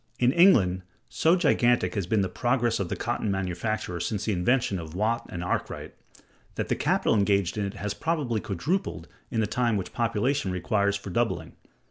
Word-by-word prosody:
[In 125 0 +3
England] 115 - +5 0.3
so 165 +2 +3
gigantic 125 -8 +2
has 100 -5 -2
been 105 +1 +2
the 95 - +1
progress 120 +1 0
of 95 -3 -2
the - - -2
cotton 105 - -2
manufacture 95 0 -2
since 100 +4 -2
the 110 - 0
inventions 100 +1 +1
of 80 0 -8
Watt 115 +4 0
and 90 -1 -5
Arkwright, 90 - -3 0.6
that - - -3
the - - +2
capital - - +1
engaged 100 -4 +2
in 105 -2 -1
it 100 +2 -5
has 105 0 -3
probably 125 -3 -1
quadrupled 155 - -2 0.2
in 115 -3 0
the - - +2
time 120 0 0
which 95 - -5
population 115 -1 0
requires 100 +2 0
for 100 -1 -6
doubling. 120 +3 -1
105 Hz, 180 wpm, -27 LUFS, 95-120 Hz, 0.6 s, England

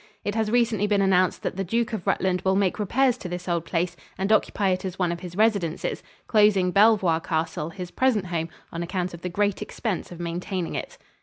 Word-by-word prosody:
It 205 - -1
has 220 -1 0
recently 225 -3 +2
been 205 -1 +2
announced 185 -2 +2
that - - -3
the 195 - 0
Duke 230 +5 -1
of 205 -5 -4
Rutland 185 -1 +1
will 190 0 +2
make 195 +1 +1
repairs 250 +4 +2
to 180 - -6
this 180 +1 -5
old 170 -2 0
place 175 +1 -1 0.2
and 195 +2 -1
occupy 210 -2 +2
it 185 0 0
as 190 -1 -5
one 180 -2 +1
of 170 - -4
his 175 -1 -8
residences, 200 -6 +1 0.2
closing 205 -4 +4
Belvoir 195 -5 +4
Castle, 160 -1 -2
his 180 0 -7
present 245 -7 +1
home, 170 -2 -2 0.2
on 170 - -4
account 180 +1 -2
of 170 - -9
the 180 - -3
great 205 +2 0
expense 205 -8 -3
of 175 - -9
maintaining 175 +1 -3
it. - - -5
190 Hz, 215 wpm, -25 LUFS, 175-210 Hz, 0.2 s, closing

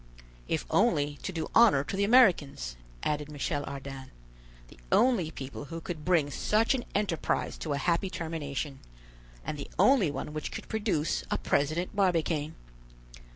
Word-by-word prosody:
"If - - -1
only 145 0 +2
to 190 - -4
do 165 -3 -4
honor 220 -13 +6
to 170 - -4
the 200 - +1
Americans," 175 - +4 0.3
added 150 0 -1
Michel 145 0 -2
Ardan, 135 -1 -7 0.6
"the - - -16
only 235 -11 +3
people 140 -1 -7
who 165 +4 -6
could 165 -2 -6
bring 160 -5 +2
such 220 - +2
an 255 -2 -2
enterprise 200 -5 0
to 155 - -2
a - - -1
happy 170 +5 +1
termination, 150 -5 -4 0.7
and 150 - -4
the 140 - -6
only 255 - +5
one 145 +2 -5
which 155 - -4
could - - -7
produce 205 -8 -1
a - - 0
President 155 +7 0
Barbicane. 165 -5 +1
155 Hz, 155 wpm, -29 LUFS, 145-190 Hz, 0.7 s, honor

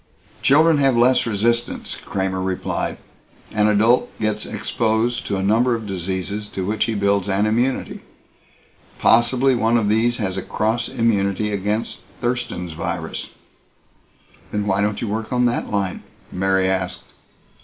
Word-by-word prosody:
"Children 155 +2 +5
have 135 -3 +3
less 125 +1 +4
resistance," 115 +2 -1
Kramer 95 -1 -3
replied. 95 -1 -2 0.5
"An 105 -1 +2
adult 110 +4 +3
gets 105 -1 -1
exposed 115 +1 -1
to 100 - -1
a 95 - -2
number 115 +5 +3
of 115 -1 -6
diseases 95 +2 -3
to 95 -2 -4
which 105 +3 0
he 115 - -2
builds 100 -1 +1
an 100 +2 +2
immunity. 120 +5 0 1.0
Possibly 125 +3 +4
one 120 -1 +2
of 105 -3 +1
these 115 +3 +2
has 95 -4 -2
a - - -1
cross 110 +4 -1
immunity 105 -4 +1
against 105 +3 -2 0.2
Thurston's 120 -8 -2
virus." 85 0 -4 1.2
"Then 105 -1 -1
why 100 -1 +1
don't 105 0 -1
you - - -2
work 110 +2 -3
on 125 -1 +2
that 120 0 0
line?" 100 -3 -2 0.3
Mary 95 0 +1
asked. 90 -1 -2
105 Hz, 145 wpm, -21 LUFS, 95-120 Hz, 1.2 s, Children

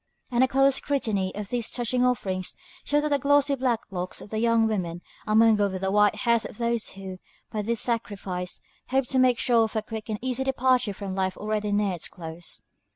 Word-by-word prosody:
And 245 +1 +4
a - - +5
close 270 +1 +4
scrutiny 215 -10 -1
of 205 -1 -5
these 240 -2 -1
touching 245 +1 0
offerings 190 -7 0 0.3
shows 295 0 +1
that 300 - 0
the 285 -1 +2
glossy 285 +1 +3
black 250 -4 0
locks 180 -1 -4
of - - -11
the 215 - -1
young 230 0 +3
women 180 -6 -2 0.2
are 215 - +2
mingled 215 -3 +5
with 185 - -4
the 190 0 0
white 210 0 +4
hairs 235 -2 +2
of - - -8
those 235 -1 -1
who, 190 -1 -8 0.3
by 215 -2 -2
this 230 +2 -1
sacrifice, 195 -6 -3 0.3
hope 265 0 +2
to 260 - +2
make 255 -2 +4
sure 230 -2 +3
of 220 - -7
a 220 - 0
quick 220 0 -7
and 215 - -1
easy 260 +1 -1
departure 255 -4 +2
from 195 0 -6
a - - -4
life 190 -1 -1
already 210 0 -2
near 205 -2 +1
its 170 - -4
close. 165 -1 -8
220 Hz, 220 wpm, -26 LUFS, 195-250 Hz, 0.3 s, a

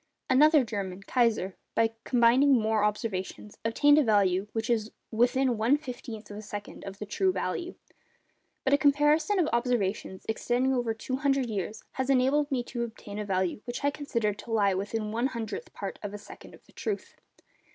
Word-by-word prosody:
Another 300 +2 +6
German, 195 -4 -5
Kaiser, 220 -6 +1 0.2
by 225 0 +3
combining 250 +3 +5
more 215 -1 +1
observations, 210 -1 -3
obtained 290 +6 +4
a - - +4
value 200 -4 +2
which 225 0 -2
is 225 -2 0 0.2
within 245 +1 +2
one 240 +7 +4
fifteenth 240 -7 -8
of 205 - -7
a - - -6
second 205 -1 -8
of 195 0 -7
the 210 - -6
true 195 -2 +1
value. 185 - -3 0.9
But 270 - +2
a 285 - +5
comparison 295 +7 +3
of 345 -4 +3
observations 225 -6 -1
extending 245 +4 +1
over 240 -3 0
200 270 +3 0
years 210 +1 -4
has 260 0 -3
enabled 275 +3 +3
me 260 -4 0
to 240 0 -5
obtain 215 -3 -6
a 210 - -3
value 185 -1 -1
which 240 +2 -5
I 285 - +3
consider 235 -8 -1
to 225 +3 -10
lie 205 -3 +3
within 210 +3 -3
one 235 +4 +1
hundredth 225 -5 -5
part 200 - -6
of 205 -1 -5
a - - -4
second 205 - -13
of - - -22
the - - -23
truth. 420 - -4
230 Hz, 180 wpm, -28 LUFS, 205-265 Hz, 0.9 s, Another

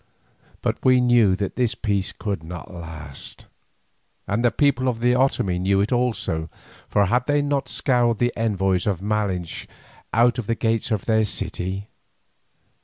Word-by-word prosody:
But - - -1
we 130 -1 +5
knew 120 -6 +4
that 100 0 -3
this 125 -3 +1
peace 100 -3 -1
could 100 -6 -4
not 85 +2 -8
last, 80 -5 -9 0.8
and 105 +4 0
the 120 - +5
people 135 +1 +2
of 125 -3 0
the 125 +1 +3
Otomie 125 -8 +1
knew 95 +1 +2
it 100 +2 0
also, 110 -10 0 0.4
for 100 - +3
had 125 +6 +1
they 145 0 +2
not 140 -2 -1
scourged 120 -4 +1
the 120 0 +1
envoys 95 -4 0
of 95 -3 -1
Malinche 100 -5 -2 0.4
out 120 +1 +3
of 110 - -5
the 115 - +1
gates 115 0 0
of 110 -5 -1
their 110 -1 +3
city? 95 -1 -3
110 Hz, 160 wpm, -23 LUFS, 95-120 Hz, 0.8 s, we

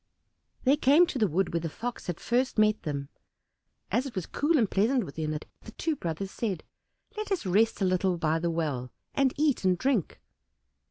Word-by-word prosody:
They 275 +3 +4
came 290 +5 +6
to 280 - -4
the 215 - +4
wood 180 +2 0
where 170 - +1
the 165 0 -3
Fox 240 +8 -6
had 175 -2 -3
first 250 +2 0
met 215 0 +3
them, 140 -2 -4 0.8
as 260 +3 +1
it 245 - -9
was 185 -3 -2
cool 310 +3 +1
and 230 -6 +3
pleasant 230 +7 +2
within 155 0 -4
it, 155 0 -4 0.2
the - - -12
two 320 -2 -1
brothers 185 - -4
said, 195 -9 -3 0.5
"Let 425 -1 -5
us 370 - 0
rest 205 +3 +2
a - - +4
little 185 0 +1
by 160 0 +1
the 170 +1 0
well, 145 -7 -2 0.2
and 275 -2 +3
eat 295 -6 +2
and 185 -1 +3
drink." 255 - 0
195 Hz, 200 wpm, -28 LUFS, 165-260 Hz, 0.8 s, came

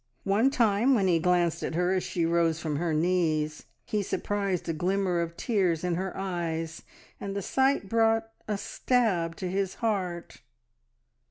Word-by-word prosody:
One 205 +7 +3
time, 240 -1 +3
when 200 -5 +2
he 170 -2 +3
glanced 175 -1 +2
at - - -3
her 180 +2 +2
as 185 - 0
she 170 -2 -1
rose 165 -1 +2
from 155 -3 -2
her 170 +1 -1
knees, 155 -2 0 0.2
he 210 - -1
surprised 200 -2 -2
a 165 - 0
glimmer 180 +1 0
of 170 0 -4
tears 185 -8 +1
in 180 -1 0
her 185 +2 -3
eyes, 165 -4 -3 0.4
and 200 0 -5
the 200 - -2
sight 265 -1 +1
brought 225 +1 +2 0.2
a 210 -2 -1
stab 195 -8 0
to 185 - -4
his 190 +1 -1
heart. 180 - -3
180 Hz, 165 wpm, -28 LUFS, 170-205 Hz, 0.4 s, One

